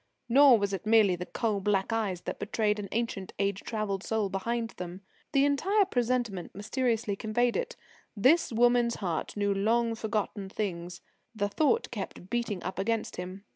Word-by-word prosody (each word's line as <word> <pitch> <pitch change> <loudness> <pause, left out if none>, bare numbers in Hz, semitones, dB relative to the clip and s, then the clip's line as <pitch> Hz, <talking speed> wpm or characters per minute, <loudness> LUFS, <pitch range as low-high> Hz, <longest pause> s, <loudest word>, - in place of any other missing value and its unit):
Nor 265 0 +7
was 200 -1 -1
it 195 +2 -4
merely 215 -4 +5
the 180 +1 -6
coal 215 -4 -1
black 195 +2 0
eyes 200 -6 -1
that - - -5
betrayed 210 0 0
an 200 -2 -5
ancient, 225 -4 -3
age 200 0 0
travelled 215 -4 -2
soul 220 -3 0
behind 230 +4 -2
them. 180 +1 -6 0.3
The 275 -1 +4
entire 385 +9 +3
presentment 240 - -1
mysteriously 225 0 -1
conveyed 235 +3 0
it. - - -2 0.4
This 270 - +4
woman's 240 0 +3
heart 175 0 -3
knew 200 -1 +1
long 230 +4 +1
forgotten 215 -3 -3
things 180 -4 -4 0.3
the 205 -1 0
thought 315 - +1
kept 185 - -7
beating 235 -6 -2
up 190 - -4
against 225 +3 -1
him. 185 +2 -6
215 Hz, 165 wpm, -29 LUFS, 195-235 Hz, 0.4 s, Nor